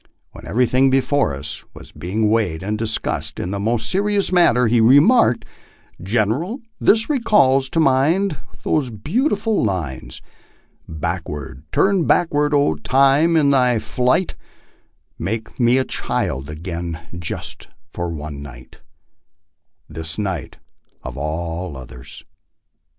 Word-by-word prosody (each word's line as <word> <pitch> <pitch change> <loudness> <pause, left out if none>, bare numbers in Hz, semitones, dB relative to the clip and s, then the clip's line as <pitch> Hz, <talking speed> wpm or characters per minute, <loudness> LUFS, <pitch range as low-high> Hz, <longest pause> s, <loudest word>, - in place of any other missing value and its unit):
When - - -12
everything 125 +7 +3
before 135 - +1
us 70 +2 -6
was - - -12
be 80 +4 -8
ing 110 +2 0
Aveighed 105 -7 +1
and 105 +2 -2
discussed 110 0 -3
in 90 - -3
the 100 - -3
most 115 +2 0
serious 200 +1 +1
manner, 150 -9 +4
he 115 +1 +3
remarked: 140 - +5 0.6
"Gen 105 +3 +1
eral, 175 - -2 0.2
this 220 +1 +4
recalls 140 - +3
to 165 - -1
my 135 -2 +4
mind 190 -2 0 0.3
those 145 -5 0
beautiful 210 - 0
lines: 85 - -3 0.7
Backward, 75 -4 -5
turn 195 -4 +2
backward, 150 -4 +2 0.3
Time, 140 +5 +4
in 145 -3 +4
thy 125 -3 +3
flight, 125 - 0 0.9
Make 110 +4 -4
me 120 +1 +4
a 130 - +1
child 65 +2 -2
again 85 +1 -5 0.2
just 85 - -5 0.2
for 85 0 -5
one 75 -3 -6
night 65 -3 -12 1.1
this 80 +1 -7
night 95 -8 -4 0.5
of - - -7
all 80 +2 -4
others." 65 -1 -11
115 Hz, 125 wpm, -20 LUFS, -, 1.1 s, remarked